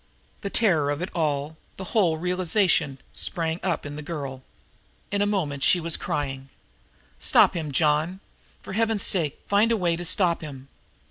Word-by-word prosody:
The 200 - -3
terror 170 -11 +2
of 145 +4 -2
it 185 - -5
all, 150 -2 -1 0.2
the 190 - -6
whole 180 -8 +3
realization, 180 -4 +1 0.2
sprang 165 0 -1
up 180 -5 -2
in 145 0 -6
the - - -5
girl. 140 -4 -6 0.7
In 200 0 0
a 205 - +2
moment 155 -9 -1
she 175 +6 +4
was 165 -1 +1
crying: 135 -2 -4 0.7
"Stop - - +4
him, 155 -4 -3
John 155 +5 +1 0.4
for - - -8
Heaven's 225 -1 +2
sake, 160 -7 +2
find 210 +3 +3
a 230 - +2
way 175 -4 +1
to 175 - -5
stop 175 0 +2
him." 140 -3 -9
165 Hz, 170 wpm, -25 LUFS, 145-190 Hz, 0.7 s, she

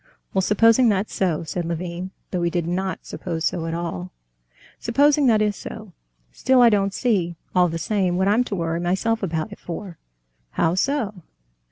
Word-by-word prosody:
"Well, 190 - +2
supposing 230 +5 +4
that's 200 0 0
so," 175 -4 0
said 175 +2 -3
Levin, 170 +2 -4 0.2
though 180 - -1
he 170 - +1
did 170 -1 -1
not 185 +2 -3
suppose 165 -3 -4
so 165 -1 -1
at 165 - -2
all, 95 - -4 0.7
"supposing 285 +4 +3
that 215 -3 +4
is 210 -1 0
so, 215 -3 -9 0.4
still 260 - +2
I 240 -1 +8
don't 200 -1 +2
see, 190 -7 0 0.2
all 180 -1 +4
the 165 0 -3
same, 185 0 0
what 190 +1 +2
I'm 215 +5 +4
to 205 - -3
worry 165 -2 -1
myself 190 +6 0
about 165 +1 -2
it 205 - -10
for." 175 0 -7 0.5
"How 165 - +2
so?" 210 -2 -1
190 Hz, 180 wpm, -23 LUFS, 170-215 Hz, 0.7 s, I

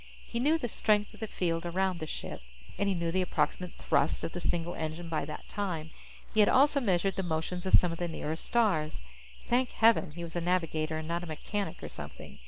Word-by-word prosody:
He 235 - -3
knew 300 +6 +4
the 245 - -2
strength 210 -2 +2
of - - -14
the 220 - -3
field 165 -4 -1
around 185 +1 0
the 155 - -4
ship, - - -5 0.4
and 200 - +2
he 195 - +1
knew 170 -1 -1
the 185 +2 +2
approximate 180 0 -1
thrust 140 +1 +1
of - - -2
the 175 - -5
single 175 0 -1
engine 160 +1 -4
by 155 -3 -1
that 150 0 -7
time. 170 -6 -3 0.4
He 220 - +2
had 210 - +7
also 280 +2 +5
measured 195 -3 +1
the - - +1
motions 175 +2 -2
of - - +6
some 180 - +5
of 165 - -5
the 175 - 0
nearer 160 -1 -3
stars. 165 - +1 0.5
Thank 250 +1 +2
heaven 220 -5 +4
he 170 +2 -6
was 170 0 -7
a 175 - 0
navigator 165 -3 0
and 155 0 -5
not 170 +1 -1
a 175 - -7
mechanic 180 +3 -4
or - - -3
something! - - -9
175 Hz, 225 wpm, -31 LUFS, 165-200 Hz, 0.5 s, had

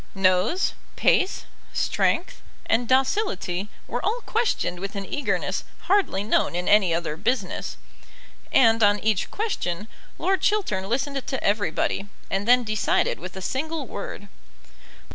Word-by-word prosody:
Nose, 195 - +2 0.2
pace, 375 - +2 0.3
strength, 350 - 0 0.2
and 230 +1 +1
docility 255 - +1 0.2
were 245 - -3
all 460 +4 0
questioned 435 - 0
with 195 +2 -5
an 200 -1 -4
eagerness 205 -8 -1 0.2
hardly 375 - +2
known 210 -4 +1
in 180 0 -2
any 205 -4 +5
other 165 -2 -1
business; 250 +10 -2 0.7
and 230 -3 +5
on 205 -1 +5
each 215 -3 +1
question 210 - -2 0.3
Lord 385 0 +1
Chiltern 210 - 0
listened 270 +2 -1
to 265 - -2
everybody, 200 0 0 0.2
and 195 +2 -1
then 250 +1 +6
decided 215 -2 +1
with 185 +3 -8
a 190 - -6
single 305 - -2
word. 205 -2 -7
215 Hz, 130 wpm, -25 LUFS, 195-280 Hz, 0.7 s, then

